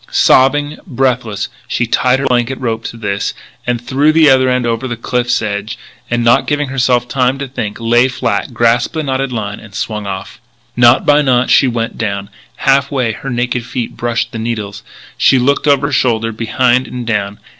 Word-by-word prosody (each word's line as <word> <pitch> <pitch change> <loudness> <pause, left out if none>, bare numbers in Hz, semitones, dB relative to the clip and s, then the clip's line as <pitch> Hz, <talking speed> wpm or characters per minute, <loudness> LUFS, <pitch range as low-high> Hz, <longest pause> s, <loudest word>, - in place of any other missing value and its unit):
Sobbing, 145 +3 +3
breathless, 125 - -1 0.2
she 120 - -1
tied 125 +2 +2
her 135 - -2
blanket 125 0 0
rope 115 -3 -2
to 115 - -6
this, 100 -3 -3 0.5
threw 135 +5 +2
the 155 -2 +5
other 130 -1 +4
end 125 -1 0
over 115 +2 -1
the 120 -2 -4
cliff's 120 0 -1
edge, 105 0 -4 0.3
and, 120 0 0
not 125 +3 +3
giving 145 -1 -1
herself 125 -2 +1
time 130 +1 0
to 140 0 -5
think, 110 -5 -5
lay 120 +2 +3
flat, 115 -5 -2
grasped 120 +5 +1
the 160 - -1
knotted 135 -1 -2
line, 105 -3 -4
swung 105 0 -4
off. 95 +4 -7 0.3
Knot 120 +1 +5
by 145 +1 +5
knot 130 -3 +2
she 135 - +5
went 115 -2 -3
down. 100 -2 -3 0.2
Half 140 +1 +2
way 125 -5 0
her 135 +5 -7
naked 125 0 -1
feet 120 0 -5
brushed 120 0 -2
the 115 - -6
needles. 105 -3 -4 0.4
She 135 - +5
looked 140 +4 +1
over 140 -1 +3
her - - -5
shoulder, 115 -3 +1
behind 120 +3 +1
and 125 -1 -6
down. 105 -3 -2
120 Hz, 185 wpm, -15 LUFS, 115-130 Hz, 0.5 s, the